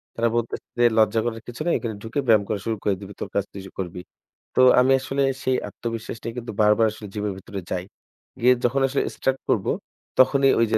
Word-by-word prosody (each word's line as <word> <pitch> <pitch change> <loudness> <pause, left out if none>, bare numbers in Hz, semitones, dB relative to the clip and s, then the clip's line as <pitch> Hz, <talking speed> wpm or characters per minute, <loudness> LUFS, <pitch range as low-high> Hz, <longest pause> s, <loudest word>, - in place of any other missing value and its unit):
তারা 115 0 +2
বলতেছে 115 -1 -3
যে - - +5
"লজ্জা 110 0 +4
করার 115 -1 -3
কিছু 120 +5 -8
নাই। 175 - +2
এখানে 115 -3 -4
ঢুকে 115 +5 -3
ব্যায়াম 110 -3 +5
করা 105 - -1
শুরু 115 -1 0
করে 100 - +2
দিবি, 100 0 -9
তোর - - -3
কাজ 100 - +2
তুই 100 - -8 0.2
করবি।" 90 -1 -4 0.5
তো - - +5 0.2
আমি 130 +1 +4
আসলে 135 +1 -2 0.2
সেই 130 -1 +2
আত্মবিশ্বাস 115 -1 -5
নিয়ে 115 - -4
কিন্তু 120 -2 -5
বারবার 105 +2 +5
আসলে 105 0 -9
জিমের 105 -1 -2
ভিতরে 100 +1 -7
যাই। 90 - -1 0.6
গিয়ে 125 +2 +6
যখন 135 +3 +2
আসলে 140 - 0
start 135 0 0
করবো - - +2 0.5
তখনই 135 +1 +5
ওই 115 - +5
যে - - +4
115 Hz, 210 wpm, -24 LUFS, 105-125 Hz, 0.6 s, গিয়ে